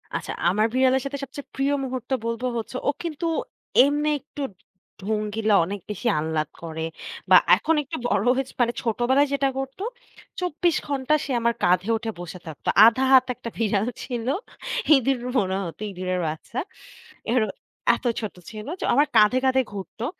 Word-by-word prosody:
আচ্ছা। - - -3 0.2
আমার 210 +4 +2
বিড়ালের 260 0 +3
সাথে 280 +1 -3
সবচেয়ে 280 +1 -8
প্রিয় 275 +1 +1
মুহূর্ত 255 -2 -5 0.2
বলবো 230 +2 -2
হচ্ছে, 230 +3 -5
ও - - +5
কিন্তু 335 0 -4 0.6
এমনি 295 +1 +1
একটু 285 +1 -10 0.6
ঢঙ্গিলা 215 +1 0
অনেক 200 +3 -5
বেশি 210 +4 -3
আহ্লাদ 155 -1 -1
করে 160 -1 -4 0.4
বা - - +8 0.2
এখন 325 - +1
একটু 270 - -5
বড় 205 +1 +1
হয়েছে 265 0 -3
মানে 235 0 +2
ছোটবেলায় 245 +5 +2
যেটা 275 -1 +2
করতো 270 +8 -5 0.6
24 305 -5 0
সে 280 - -4
আমার 235 0 +2
কাঁধে 180 +4 +3
উঠে 225 0 -4
বসে 175 +1 -7
থাকতো। 155 - -9 0.2
১/২ 235 +3 +4
হাত 260 -1 +7
১ - - -27
টা 230 - -1
ভিড়াল 215 -1 +1 0.2
ছিল। 240 -2 -4 0.7
ইঁদুর 265 -1 +2 0.2
মনে 190 -4 +1
হতো 170 +4 -8
ইঁদুরের 185 0 -2
বাচ্চা। 160 +10 -5 0.7
এরো 220 -4 +3 0.5
এত 245 - -11 0.2
ছোট 215 -3 -5 0.2
ছিল 215 -1 -8
যে - - -5
ও - - 0
আমার 290 +3 +4
কাঁধে, 210 +4 +6
কাঁধে 260 0 +4
ঘুরতো। 205 +4 -6
235 Hz, 165 wpm, -24 LUFS, 205-270 Hz, 0.7 s, বা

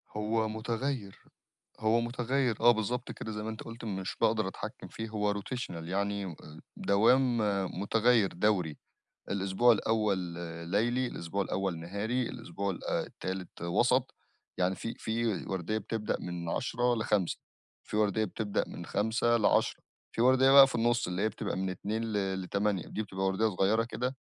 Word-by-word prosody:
هو 110 +1 0
مُتغيّر، 115 0 -3 0.6
هو 110 +2 +3
مُتغيّر 125 0 0
آه 120 - +8
بالضبط 120 +3 -2
كده 110 - -6
زي 105 0 -4
ما 110 - -3
أنت 110 - -6
قُلت 115 +1 -8
مش 95 -3 -3
باقدر 110 -2 +3
اتحكم 95 - -7
فيه 110 0 -6
هو 105 -1 0
rotational 120 +5 -4
يعني 100 +3 -1
و - - -4
آآ 75 0 -12 0.2
دوام 120 +5 +4 0.4
مُتغيّر 115 0 +3
دَوري 90 -5 +1 0.5
الإسبوع 100 +5 +3
الأول 105 -2 +1 0.5
ليلي، 120 +6 +2
الإسبوع 95 -2 -3
الأول 95 -3 -2
نهاري، 100 +9 -2
الإسبوع 100 -4 -4
ال 90 - -6
آآ - - 0
التالت 95 -2 -6
وَسَط، 120 +9 +2 0.4
يعني 90 +1 +2
في 115 - -5
في 115 +1 -1 0.2
ورديّة 95 +3 -2
بتبدأ 110 0 -2
من 90 -1 -5
10:00 120 +5 +1
ل17:00 105 -5 0 0.5
في - - -4
ورديّة 105 0 +2
بتبدأ 105 +1 -1
من - - -8
17:00 115 +2 +2
ل22:00 110 - +2 0.3
فيه 115 - 0
ورديّة 130 +1 +6
بقى 135 0 +10
في 135 - -7
النُص 120 0 +2
اللي 90 +2 -2
هي 110 - +3
بتبقى 110 - -4
من 95 0 -1
14:00 105 +5 -3
ل 95 -4 -1
ل20:00 100 0 0
دي 110 - -3
بتبقى 95 -2 -3
ورديّة 95 +4 +2
صغيّرة 105 +3 +2
كده 125 +2 -3
110 Hz, 160 wpm, -31 LUFS, 95-115 Hz, 0.6 s, بقى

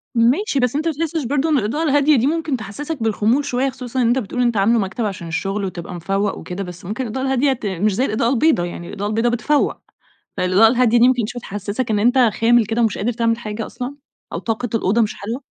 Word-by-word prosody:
ماشي، 265 - +2
بس 250 0 +1
أنت 315 +3 0
ما 325 - +1
بتحسش 320 +1 -2
برضو 285 +5 0
إن 305 - +3
الإضاءة 250 +7 -1
الهادية 290 0 +4
دي 245 +3 +2
ممكن 315 -3 -1
تحسسك 265 +6 -5
بالخمول 225 +5 +1
شوية، 265 0 0
خصوصًا 255 -1 -4
أنت 240 +2 +3
بتقول 245 +2 -3
أنت 240 -3 +1
عامله 225 +4 +3
مكتب 215 +4 -2
عشان 190 -4 -5
الشغل 195 +5 -2
وتبقى 180 -1 -6
مفوّق 195 +4 -1
وكده، 180 +2 -5
بس 180 -1 -10
ممكن 215 +8 -3
الإضاءة 255 +3 -3
الهادية 265 +1 +2
ت 240 -4 -8
مش 200 +1 0
زي 255 - +1
الإضاءة 230 -1 0
البيضاء، 270 - +2
يعني 175 0 -7
الإضاءة 205 +1 -4
البيضاء 225 +3 +1
بتفوّق، 285 +5 +1 0.6
فالإضاءة 185 +5 +4
الهادية 240 0 +3
دي 240 +2 +6
ممكن 245 -4 +1
شوية 245 +2 -6
تحسسك 205 +4 -4
إن 210 - +2
أنت 245 +5 +3
خامل 235 -1 +4
كده 225 +3 -1
ومش 225 -4 +1
قادر 235 +5 0
تعمل 230 0 0
حاجة 215 -1 -5
أصلًا، 255 +3 -6 0.4
أو - - -2
طاقة 230 +2 -2
الأوضة 220 +1 +1
مش 215 -2 +1
حلوة؟ 230 +7 -5
235 Hz, 225 wpm, -20 LUFS, 210-265 Hz, 0.6 s, دي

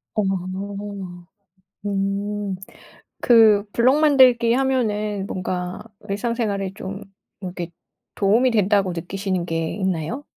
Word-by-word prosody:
어. 210 - +2 1.6
음. 200 0 -2 0.6
그 220 -4 +6
블록 255 +5 +3
만들기 255 -6 +5
하면은 215 -6 0
뭔가 180 -1 -4 0.3
일상생활에 200 -2 -2
좀 195 +1 -7 0.4
이렇게 180 -3 -5 0.4
도움이 220 +6 +3
된다고 200 -4 +2
느끼시는 185 +1 -3
게 165 -1 -2
있나요? 190 - -2
205 Hz, 210 characters per minute, -22 LUFS, 190-230 Hz, 1.6 s, 그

